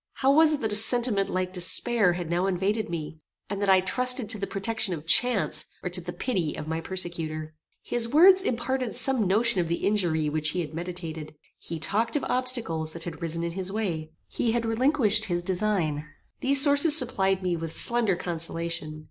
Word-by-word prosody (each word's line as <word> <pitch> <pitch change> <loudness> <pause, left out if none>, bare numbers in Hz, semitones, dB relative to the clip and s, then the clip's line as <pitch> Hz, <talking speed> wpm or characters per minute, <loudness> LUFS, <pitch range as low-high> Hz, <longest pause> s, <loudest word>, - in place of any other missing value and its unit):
How 270 +1 +2
was 315 +1 +5
it 290 - -3
that 220 -2 -2
a - - 0
sentiment 225 -2 +1
like 185 0 -3
despair 195 +2 +1
had 175 -1 -5
now 175 +3 -1
invaded 195 +3 -1
me, 160 -2 -6 0.3
and 200 0 -4
that 200 - 0
I 190 -1 +5
trusted 250 +4 0
to 220 - -5
the 195 - -3
protection 200 -2 -2
of 155 -1 -10
chance, 230 +6 +2 0.2
or 180 - -4
to 180 0 +2
the 175 +1 -6
pity 180 - -3
of 150 - -7
my 160 +1 -3
persecutor? 165 -4 -4 0.3
His 240 -1 +1
words 370 +7 +6
imparted 250 - -2
some 250 -4 +2
notion 215 +1 +3
of 170 - -3
the 170 +1 -3
injury 175 -7 0
which 155 +1 -1
he 180 +3 -2
had 155 -2 -7
meditated. 165 -3 -7 0.2
He 165 - -7
talked 205 - -2
of 295 - -1
obstacles 235 -11 -1
that 170 - -8
had 170 0 -8
risen 165 0 -2
in 170 - -3
his 190 +2 -4
way. 170 -7 -4 0.2
He 230 - -2
had 235 -1 -1
relinquished 225 -2 +2
his 175 -3 -2
design. 180 -6 -1 0.4
These 275 +1 +7
sources 290 +1 +7
supplied 195 -8 0
me 180 -1 -1
with 165 -1 -6
slender 235 -5 +1
consolation. 165 -2 -4
190 Hz, 195 wpm, -26 LUFS, 170-235 Hz, 0.4 s, These